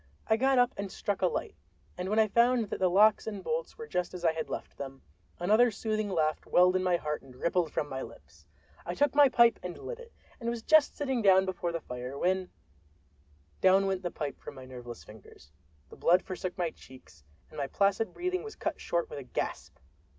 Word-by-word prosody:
I 220 - +3
got 265 +3 +2
up 245 0 +4
and 200 -1 -4
struck 205 0 -3
a 185 - +4
light; - - -3 0.4
and 180 +1 -4
when 215 - 0
I 220 -1 +5
found 235 0 +2
that - - -3
the 185 -1 +3
locks 210 +4 +4
and 205 -3 -5
bolts 485 +1 -3
were 460 - -7
just 180 - -3
as 175 -1 -5
I 165 - +5
had 160 0 -5
left - - -6
them, 135 -1 -7 0.3
another 215 +7 +4
soothing 215 -1 -2
laugh 155 -4 0
welled 180 +1 +5
in 185 - +2
my 180 -1 +2
heart 150 -2 -3
and 130 -2 -16
rippled 170 +3 0
from 145 - -2
my 130 -2 -5
lips. - - -13 0.4
I - - -4
took 290 -2 +2
my 285 -1 +6
pipe 235 -2 +5
and 180 -1 -6
lit - - -7
it, 470 -1 -12 0.3
and 235 -2 -2
was 235 -1 -4
just 310 +1 +4
sitting 265 -4 -1
down 190 -2 +5
before 185 -2 -3
the 165 - -3
fire, 125 +1 -6
when—down 185 +3 0 1.4
went 190 -1 -1
the 175 - -2
pipe 150 -4 -5
out - - -26
of - - -5
my 130 -1 -10
nerveless 125 -2 -9
fingers, 100 -9 -16 0.4
the - - -13
blood 180 +2 +4
forsook 185 -1 -5
my 175 -3 -1
cheeks, 130 - -17 0.3
and 155 - -8
my 140 - -1
placid 200 +6 +1
breathing 365 +1 -2
was 435 - -9
cut - - -4
short 170 -1 -1
with - - -7
a - - -8
gasp! 125 - -4
185 Hz, 220 wpm, -30 LUFS, 160-230 Hz, 1.4 s, my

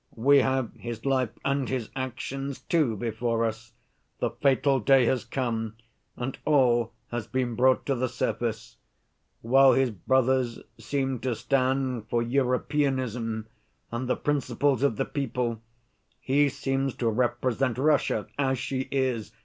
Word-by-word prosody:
We 140 +5 +5
have 130 -2 0
his 120 0 -7
life 130 -3 +2 0.2
and 140 -1 0
his 125 -4 -3
actions, 135 +1 -4
too, 145 -10 +1
before 115 +1 -1
us; 110 +1 -5 0.4
the - - -1
fatal 135 0 +2
day 130 +2 +5
has 130 +1 +1
come 115 -3 -3 0.4
and 125 +2 -4
all 120 -6 +3 0.2
has 120 -2 -3
been 125 +1 -1
brought 130 +3 +3
to 140 - +1
the 130 0 -1
surface. 115 -1 -3 0.7
While 135 +3 +6
his 130 -2 +2
brothers 130 +4 +1 0.2
seem 135 -3 -2
to 125 -1 -1
stand 130 -3 0
for 120 0 +1
'Europeanism' 125 -3 0 0.5
and 120 +2 -3
'the - - +2
principles 145 -2 0
of 140 -5 +2
the - - -1
people,' 120 -4 -2 0.6
he 140 +2 +2
seems 135 -1 -2
to 120 - -1
represent 125 +2 0
Russia 135 -6 +2
as 135 -1 +1
she 130 +1 -3
is. 130 -6 -1
130 Hz, 140 wpm, -27 LUFS, 115-135 Hz, 0.7 s, While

